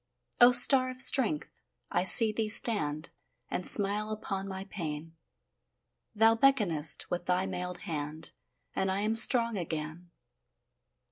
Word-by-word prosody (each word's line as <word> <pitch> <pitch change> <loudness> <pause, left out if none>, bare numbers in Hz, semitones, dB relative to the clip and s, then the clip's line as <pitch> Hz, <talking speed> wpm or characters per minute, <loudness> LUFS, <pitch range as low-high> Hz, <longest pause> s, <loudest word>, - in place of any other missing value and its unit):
O 245 +1 +5
star 255 +1 +4
of 255 0 -11
strength! 270 +2 +2 0.3
I - - -1
see 220 +3 +7
thee 215 0 -5
stand 155 -9 0 0.4
And 180 - -4
smile 205 +1 +3
upon 195 -2 -7
my 190 0 -8
pain; 165 -4 -9 1.0
Thou 225 +1 +2
beckonest 200 - 0
with 175 0 -6
thy 180 +1 -2
mailed 180 -1 -8
hand, 155 -3 -5 0.4
And 190 0 -3
I 195 +1 -4
am 215 +1 -3
strong 230 -1 +3
again. 160 +1 -8
195 Hz, 130 wpm, -27 LUFS, 170-225 Hz, 1.0 s, see